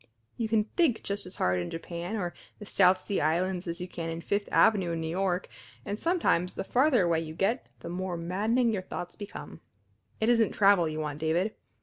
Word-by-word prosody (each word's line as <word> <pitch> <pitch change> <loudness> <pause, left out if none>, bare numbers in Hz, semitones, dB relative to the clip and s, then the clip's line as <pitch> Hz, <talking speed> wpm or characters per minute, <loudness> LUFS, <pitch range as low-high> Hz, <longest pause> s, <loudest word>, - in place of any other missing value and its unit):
You 225 -2 -2
can 220 -1 +3
think 255 - +1
just 200 -2 -3
as 180 - -8
hard 90 0 +1
in 85 - -3
Japan 170 +4 -5
or 180 -5 -2 0.2
the 210 - -9
South 185 -2 +4
Sea 200 +1 -1
Islands 175 +4 0
as 170 0 -3
you 180 - -4
can 165 -2 -5
on 165 +1 -4
Fifth 200 +3 -1
Avenue 190 -6 +4
in 165 - -2
New 160 - -3
York, 185 0 0 0.4
and 205 +1 -3
sometimes 325 - +1
the - - -3
farther 255 0 +3
away 170 -2 +2
you 160 -1 -6
get 205 +9 0
the - - -6
more 180 0 -3
maddening 215 +8 +1
your 195 - -1
thoughts 175 -1 -6
become. 205 0 -9 0.6
It 220 - +1
isn't 230 -2 +3
travel 195 -5 +4
you 155 0 -4
want, 150 -1 -3
David. 170 +7 +1
185 Hz, 210 wpm, -29 LUFS, 170-210 Hz, 0.6 s, South